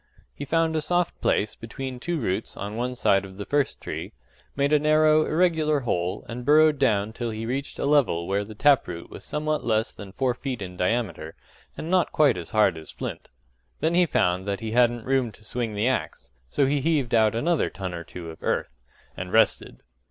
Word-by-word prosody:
He 145 - -6
found 165 +2 +1
a 155 - +1
soft 175 +2 -1
place 105 +1 +1
between 125 +2 -7
two 170 +5 -2
roots 105 -3 -3
on 105 +1 -5
one 125 +2 -2
side 100 -5 +3
of 95 -1 -11
the 100 - -5
first 145 -2 0
tree, - - -6 0.4
made 140 +2 +1
a 150 - +6
narrow, 155 +1 +4
irregular 155 -3 +2
hole, 90 -7 -2
and 120 +1 -6
burrowed 150 +1 +5
down 110 -5 +2
till 120 0 -3
he 110 0 -4
reached 135 +4 -3
a - - -2
level 140 - +2
where 100 +1 0
the 110 +1 -10
tap 140 +3 +4
root 85 -1 -7
was - - -9
somewhat 155 0 -2
less 110 -1 0
than 100 -2 -10
four 130 +4 0
feet 130 0 -5
in 90 -2 -7
diameter, 90 -5 -2 0.4
and 165 - -5
not 185 -2 +3
quite 145 -5 +4
as 85 -2 -6
hard 105 -7 +3
as 80 - -12
flint: - - -6 0.5
then 160 +2 +1
he 175 0 +4
found 90 - +1
that 100 -1 -1
he 110 -1 -5
hadn't 120 -1 +2
room 130 -3 +1
to 110 - -19
swing 115 -1 -3
the 105 +4 +1
axe, 130 -2 -2 0.2
so 140 - +2
he 140 +1 +1
heaved 145 -5 0
out 110 -1 +4
another 160 +7 +1
ton 95 -2 -6
or 85 -1 -5
two 85 -1 -8
of 80 - -14
earth 65 - -2 0.4
and 90 0 -6
rested. 110 +2 +2
120 Hz, 210 wpm, -25 LUFS, 100-145 Hz, 0.5 s, a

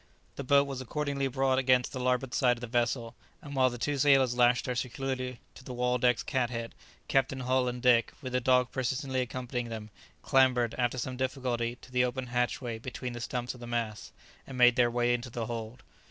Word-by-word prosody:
The 140 - -5
boat 140 +1 +5
was 135 -2 -5
accordingly 140 +1 -2
brought 130 0 +1
against 130 -1 +3
the 130 - -5
larboard 125 0 0
side 125 -3 +3
of - - -12
the - - -3
vessel, 120 0 -1 0.3
and 145 -5 -9
while 130 -1 +4
the 120 - -7
two 145 +3 -1
sailors 135 -3 +5
lashed 120 0 +3
her 125 - -1
securely 130 0 -3
to - - -14
the 130 -1 -7
"Waldeck's" 125 -1 +2
cat 130 -3 0
head, 115 -1 -5 0.3
Captain 135 0 +1
Hull 130 0 +1
and 125 0 -4
Dick, 120 -2 +4
with 130 -4 -7
the 125 - +1
dog 125 0 +3
persistently 130 +1 -1
accompanying 125 -1 -4
them, 110 -2 -7 0.3
clambered, 125 -3 +3
after 125 0 0
some 130 +1 -4
difficulty, 125 -3 -2
to 130 - -14
the 125 0 +3
open 125 +1 -2
hatchway 120 -1 -2
between 125 +1 -6
the 120 - -6
stumps 125 +1 -3
of 125 - -13
the 120 - -8
masts, 115 -3 -3 0.4
and 135 - -7
made 125 -1 +6
their 120 -1 +4
way 120 0 +1
into 120 +1 -3
the 115 -1 -4
hold. 115 +1 -6
125 Hz, 210 wpm, -30 LUFS, 120-130 Hz, 0.4 s, made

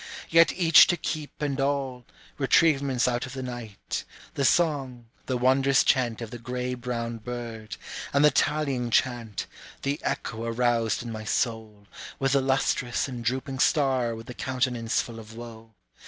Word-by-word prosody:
Yet 165 0 +6
each 165 -4 +7
to 175 - +1
keep 150 -2 -5
and 140 -1 -1
all, 135 -3 -1 0.3
retrievements 135 -3 +3
out 125 +1 -1
of 130 - -9
the 130 -1 -5
night, 120 -5 -5 0.3
The 140 - -1
song, 135 -6 +1 0.2
the 130 - 0
wondrous 135 +2 +4
chant 120 -3 +1
of 110 - -8
the 120 - -7
gray 125 +2 -3
brown 120 -2 -4
bird, 115 -2 -6 0.3
And 140 +1 +4
the 150 - +6
tallying 140 -4 0
chant, 115 -3 0 0.4
the 140 +1 -1
echo 115 0 -3
aroused 115 -1 +1
in 120 - -6
my 110 -1 -6
soul, 110 -3 -2 0.3
With 135 -1 0
the 140 0 +3
lustrous 130 -2 0
and 125 -3 -6
drooping 130 +3 -2
star 130 -6 +2
with 115 0 -9
the 125 - -8
countenance 125 -3 -1
full 115 -1 -9
of 110 0 -12
woe. 115 -1 -11
125 Hz, 160 wpm, -26 LUFS, 115-135 Hz, 0.4 s, each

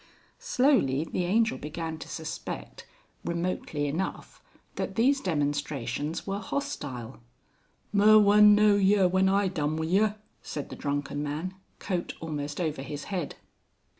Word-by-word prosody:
Slowly 250 - +2
the 175 +2 -2
Angel 220 +5 +2
began 160 +1 -5
to - - -8
suspect, 160 -1 -6 0.4
remotely 170 -3 -2
enough, 160 +7 -4 0.3
that - - -4
these 270 +4 +3
demonstrations 145 -2 -2
were 195 0 -2
hostile. 140 - -5 0.7
"Mur 210 +1 +7
wun 210 0 +7
know 210 -1 +5
yer 195 -1 +4
when 190 +1 +3
I 200 0 +3
done 155 -4 -1
wi' 160 - -1
yer," 205 +5 +2 0.3
said 145 - -6
the - - -5
drunken 145 0 -2
man, 150 +6 -3 0.2
coat 180 -3 -3
almost 150 -2 -4
over 155 -5 -2
his 145 +1 -6
head. 175 -6 -3
170 Hz, 135 wpm, -28 LUFS, 145-205 Hz, 0.7 s, Mur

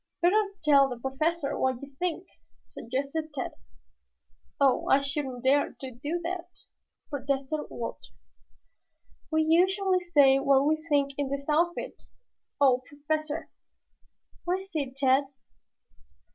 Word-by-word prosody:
"Better 400 +3 +2
tell 280 -3 +5
the 245 - -5
Professor 280 +4 -1
what 260 -2 +1
you 280 -1 -11
think," 355 0 -2 0.4
suggested 280 +6 -4
Tad. 260 - -3 1.1
"Oh, 275 -2 +3
I 270 - +5
shouldn't 275 -3 -3
dare 280 +2 +3
to 265 -1 -6
do 290 +8 -3
that," 355 0 -6 0.5
protested 280 +1 -2
Walter. - - -6 1.2
"We 315 0 +2
usually 370 +4 +3
say 285 -7 +4
what 275 0 +4
we 310 +1 +1
think 280 -1 +2
in 280 -2 -1
this 280 0 -3
outfit. 335 +3 0 0.6
Oh, 260 -3 +4
Professor!" 305 +2 -3 0.9
"What 365 +2 -1
is 385 0 -14
it, 275 -4 -3
Tad?" 270 0 +3
285 Hz, 120 wpm, -28 LUFS, 275-335 Hz, 1.2 s, tell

